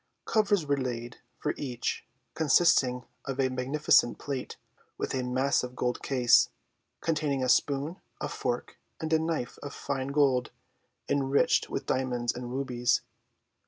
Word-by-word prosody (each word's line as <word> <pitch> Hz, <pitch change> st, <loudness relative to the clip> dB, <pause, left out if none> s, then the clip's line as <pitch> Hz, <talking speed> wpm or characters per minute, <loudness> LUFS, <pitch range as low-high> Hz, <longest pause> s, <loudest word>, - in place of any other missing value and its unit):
Covers 205 Hz, -6 st, +2 dB
were 140 Hz, -1 st, +1 dB
laid 120 Hz, -2 st, -4 dB, 0.2 s
for 150 Hz, -, -1 dB
each, 125 Hz, -4 st, -3 dB, 0.3 s
consisting 140 Hz, -5 st, +3 dB, 0.2 s
of 135 Hz, 0 st, -4 dB
a 130 Hz, -1 st, +3 dB
magnificent 130 Hz, -1 st, +3 dB
plate, 135 Hz, -3 st, -5 dB, 0.4 s
with -, -, -3 dB
a 130 Hz, -, 0 dB
massive 125 Hz, 0 st, 0 dB
gold 125 Hz, -1 st, -1 dB
case, 125 Hz, -3 st, +4 dB, 0.5 s
containing 150 Hz, -5 st, 0 dB
a -, -, +1 dB
spoon, 145 Hz, +6 st, +1 dB, 0.2 s
a -, -, -2 dB
fork, -, -, -3 dB, 0.2 s
and 160 Hz, 0 st, -2 dB
a 160 Hz, -, +5 dB
knife 160 Hz, -6 st, -2 dB
of 145 Hz, -, -7 dB
fine 135 Hz, -2 st, -3 dB
gold, 140 Hz, -3 st, +2 dB, 0.6 s
enriched 140 Hz, 0 st, +2 dB
with -, -, -3 dB
diamonds 125 Hz, -2 st, 0 dB
and 120 Hz, 0 st, -6 dB
rubies. 125 Hz, -2 st, +1 dB
135 Hz, 135 wpm, -29 LUFS, 125-145 Hz, 0.6 s, a